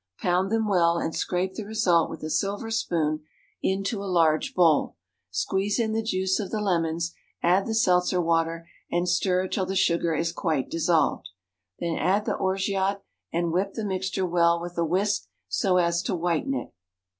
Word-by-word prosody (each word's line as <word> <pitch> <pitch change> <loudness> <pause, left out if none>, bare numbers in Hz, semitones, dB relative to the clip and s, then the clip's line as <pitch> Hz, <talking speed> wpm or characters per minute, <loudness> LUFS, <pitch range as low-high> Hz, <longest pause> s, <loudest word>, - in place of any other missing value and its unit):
Pound 180 +2 +1
them 225 -1 +1
well, 170 -4 +3
and 165 - -2
scrape 185 +1 -1
the 220 - -5
result 200 -6 +2
with 160 - -8
a 155 - -3
silver 200 +7 -1
spoon 155 -8 0 0.4
into 195 +2 -1
a 200 - -4
large 165 -3 +2
bowl. 165 -5 +3 0.3
Squeeze 195 - -1
in 220 -2 0
the 225 - +1
juice 190 -3 0
of 200 - -3
the 215 - -2
lemons, 170 -4 0 0.3
add 180 +3 +3
the 220 - -1
seltzer 180 -4 +3
water, 165 0 0 0.2
and 175 +1 0
stir 180 +1 +1
till 185 0 -2
the 190 - -3
sugar 170 -3 +2
is 165 +2 0
quite 155 -7 -1
dissolved. 165 - +1 0.5
Then 170 -1 -2
add 200 +3 +1
the - - 0
orgeat, 195 +1 0 0.3
and 170 0 0
whip 190 +3 -1
the 220 - -3
mixture 190 -1 -1
well 170 -1 +3
with 175 +1 -7
a 170 - +1
whisk, 190 - 0 0.2
so 145 - +1
as 170 -1 +2
to 180 - -2
whiten 175 - 0
it. - - -5
180 Hz, 180 wpm, -26 LUFS, 170-195 Hz, 0.5 s, well